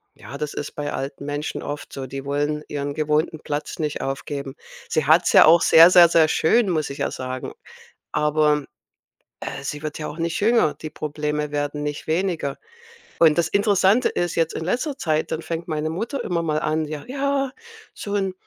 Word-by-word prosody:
ja, -, -, -11 dB
das 150 Hz, -1 st, -4 dB
ist -, -, -4 dB
bei 145 Hz, 0 st, -4 dB
alten 140 Hz, +1 st, -5 dB
Menschen 145 Hz, +1 st, -4 dB
oft 145 Hz, 0 st, -6 dB
so, 135 Hz, -1 st, -6 dB
die 135 Hz, +1 st, -7 dB
wollen 145 Hz, +2 st, -1 dB
ihren 145 Hz, -1 st, -4 dB
gewohnten 155 Hz, +1 st, 0 dB
Platz 145 Hz, +3 st, -4 dB
nicht 150 Hz, -3 st, -3 dB
aufgeben. 135 Hz, 0 st, -4 dB, 0.3 s
Sie 155 Hz, -, 0 dB
hat's 160 Hz, +5 st, +4 dB
ja -, -, +8 dB
auch 165 Hz, +1 st, +6 dB
sehr, 165 Hz, +2 st, +8 dB
sehr, 175 Hz, -2 st, +8 dB
sehr 160 Hz, -1 st, +5 dB
schön, 195 Hz, +8 st, +2 dB
muss 155 Hz, -3 st, -1 dB
ich 140 Hz, -, -7 dB
ja -, -, -1 dB
sagen, 130 Hz, 0 st, -5 dB, 0.6 s
aber, 150 Hz, -1 st, +2 dB, 0.8 s
äh, -, -, -5 dB
sie 145 Hz, +2 st, -5 dB
wird 155 Hz, 0 st, -5 dB
ja 150 Hz, -, -4 dB
auch 150 Hz, -, -8 dB
nicht 165 Hz, 0 st, -2 dB
jünger, 220 Hz, -7 st, +3 dB
die 155 Hz, -, -8 dB
Probleme 150 Hz, 0 st, -3 dB
werden 145 Hz, 0 st, -2 dB
nicht 150 Hz, 0 st, -5 dB
weniger 160 Hz, -4 st, -1 dB, 0.6 s
und 160 Hz, -2 st, +5 dB
das 170 Hz, -, +2 dB
Interessante 200 Hz, +3 st, +3 dB
ist 175 Hz, -1 st, -2 dB
jetzt 165 Hz, -1 st, +1 dB
in -, -, -4 dB
letzter 250 Hz, -, -1 dB
Zeit, 155 Hz, -, -1 dB
dann 160 Hz, 0 st, -2 dB
fängt 165 Hz, +1 st, -5 dB
meine 155 Hz, -1 st, -2 dB
Mutter 225 Hz, -, -3 dB
immer 170 Hz, -2 st, -1 dB
mal 155 Hz, -1 st, 0 dB
an: 155 Hz, +1 st, 0 dB
„Ja, 150 Hz, -1 st, -6 dB
ja, 275 Hz, 0 st, -1 dB, 0.4 s
so 205 Hz, -, -5 dB
'n 195 Hz, -2 st, 0 dB
155 Hz, 190 wpm, -22 LUFS, 145-170 Hz, 0.8 s, ja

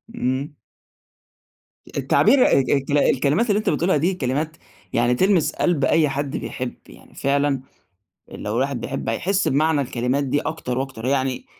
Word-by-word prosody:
امم. 135 Hz, -, -2 dB, 1.4 s
التعبير 250 Hz, +4 st, +4 dB
الك 135 Hz, -, +3 dB
الك 140 Hz, 0 st, 0 dB
الكلمات 145 Hz, -, +2 dB
اللي 205 Hz, 0 st, +3 dB
أنت 215 Hz, -, -1 dB
بتقولها 165 Hz, +2 st, +1 dB
دي 170 Hz, +6 st, +1 dB
كلمات 155 Hz, 0 st, -2 dB, 0.4 s
يعني 120 Hz, +1 st, +2 dB
تلمس 185 Hz, +1 st, +2 dB
قلب 160 Hz, -6 st, +1 dB
أي 155 Hz, -3 st, +3 dB
حد 140 Hz, 0 st, -3 dB
بيحب، 125 Hz, -1 st, -5 dB
يعني -, -, -17 dB
فعلًا 140 Hz, -1 st, 0 dB, 0.7 s
لو 105 Hz, -, -5 dB
الواحد 135 Hz, 0 st, -1 dB
بيحب -, -, -4 dB
هيحس 190 Hz, -, 0 dB
بمعنى 155 Hz, +2 st, +2 dB
الكلمات 125 Hz, +1 st, -1 dB
دي 140 Hz, +2 st, 0 dB
أكتر 130 Hz, -6 st, -3 dB
وأكتر 130 Hz, -4 st, -5 dB
يعني 130 Hz, -1 st, -1 dB
140 Hz, 145 wpm, -22 LUFS, 130-160 Hz, 1.4 s, التعبير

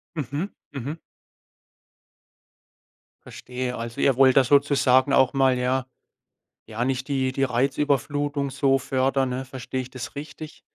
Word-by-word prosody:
Mhm. 150 Hz, -, -3 dB, 0.2 s
Mhm. 140 Hz, +3 st, -5 dB, 2.3 s
Verstehe. 125 Hz, 0 st, -5 dB
Also, 115 Hz, 0 st, -5 dB
ihr 135 Hz, -3 st, +3 dB
wollt 130 Hz, -1 st, +5 dB
da 135 Hz, -, +7 dB
sozusagen 140 Hz, -1 st, +3 dB
auch 130 Hz, -2 st, +4 dB
mal, 135 Hz, -2 st, +3 dB
ja 130 Hz, +1 st, 0 dB, 0.8 s
Ja, 115 Hz, +2 st, -3 dB
nicht 130 Hz, 0 st, -2 dB
die 135 Hz, -2 st, 0 dB
die 135 Hz, +1 st, -1 dB
Reizüberflutung 140 Hz, +2 st, 0 dB
so 135 Hz, 0 st, +2 dB
fördern, 135 Hz, 0 st, 0 dB
ne? 130 Hz, +1 st, -4 dB
Verstehe 130 Hz, 0 st, -6 dB
ich 130 Hz, -1 st, -5 dB
das 130 Hz, +1 st, -8 dB
richtig? 155 Hz, +2 st, -9 dB
135 Hz, 130 wpm, -24 LUFS, 130-140 Hz, 2.3 s, da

